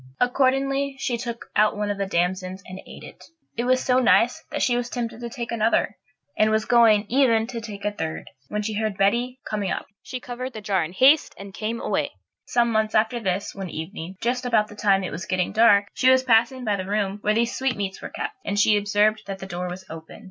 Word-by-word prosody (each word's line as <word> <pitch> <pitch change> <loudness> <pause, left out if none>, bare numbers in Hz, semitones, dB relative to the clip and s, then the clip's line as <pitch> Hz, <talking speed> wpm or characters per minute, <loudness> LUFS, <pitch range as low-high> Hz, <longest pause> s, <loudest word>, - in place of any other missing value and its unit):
Accordingly, 270 +2 +1
she 250 -2 -1
took 235 0 -6
out 210 0 +3
one 205 0 -1
of 200 - -5
the 195 - -1
damsons 185 +1 -1
and 185 +1 -9
ate - - -11
it. - - -12 0.3
It 235 - -2
was 255 +1 +2
so 255 -1 +3
nice 250 +4 +3
that 295 - -2
she 245 - +2
was 245 0 -2
tempted 235 -2 -4
to 235 - -5
take 235 -1 -6
another; 220 -2 +1 0.4
and 215 - +3
was 220 0 +1
going 225 -3 +5
even 235 -3 +3
to 235 -1 -6
take 210 -3 -8
a 210 - +1
third, 160 -6 -5 0.2
when 210 +5 -3
she 215 +1 -3
heard 215 -2 -2
Betty 240 +6 +1
coming 205 -3 -2
up. - - -3 0.2
She 255 - -6
covered 250 +1 -6
the 220 - -6
jar 195 -4 +1
in 155 - -6
haste 270 +10 +4
and 195 0 -10
came 225 +3 -3
away. - - -1 0.3
Some 235 -1 +2
months 220 -1 0
after 220 +3 +2
this, 195 -2 -2
one 195 -2 -6
evening, 165 +3 -7
just 245 +2 0
about 230 -4 +2
the 210 - -11
time 195 -2 +2
it 185 - -4
was 170 -1 -6
getting 185 -1 0
dark, 205 -2 +5
she 255 - +3
was 260 0 +5
passing 245 +1 +2
by 205 -2 +1
the 185 -1 -5
room 205 -1 -1
where 210 0 +1
these 235 +1 +1
sweetmeats 205 -8 -2
were - - -6
kept, - - -5
and 205 0 -1
she 210 0 +5
observed 205 +1 +2
that 195 -1 -4
the 190 - -8
door 180 -1 -4
was 185 +1 -8
open. 160 +3 -10
215 Hz, 230 wpm, -24 LUFS, 195-245 Hz, 0.4 s, going